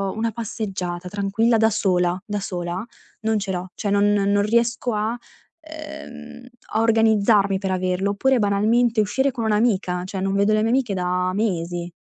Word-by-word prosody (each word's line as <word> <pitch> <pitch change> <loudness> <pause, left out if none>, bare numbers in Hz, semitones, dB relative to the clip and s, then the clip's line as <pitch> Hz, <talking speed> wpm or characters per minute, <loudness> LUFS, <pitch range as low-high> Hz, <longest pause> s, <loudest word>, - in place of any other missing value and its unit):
una 225 +1 -1
passeggiata 195 -6 -5
tranquilla 205 +4 +1
da 220 0 +4
sola, 180 -4 +1
da 210 -1 -3
sola, 180 -1 -4 0.4
non 220 0 +1
ce 195 -1 -3
l'ho. 180 0 -4
Cioè, 205 - -2
non 200 0 +3
non 200 0 +2
riesco 235 +2 +1
a 215 +2 -1
uhm, 305 -4 -12 0.3
a 220 - +2
organizzarmi 220 -3 +3
per 195 -1 -3
averlo. 185 +1 0
Oppure 265 +5 +2
banalmente 220 +3 +2
uscire 265 +7 +1
con 235 -2 -4
un'amica, 210 -5 +1
cioè, 190 +1 -5
non 195 0 -1
vedo 200 +2 +3
le 215 - +2
mie 225 - +1
amiche 250 -5 +1
da 180 0 0
mesi. 175 -4 -2
210 Hz, 165 wpm, -22 LUFS, 190-230 Hz, 0.4 s, da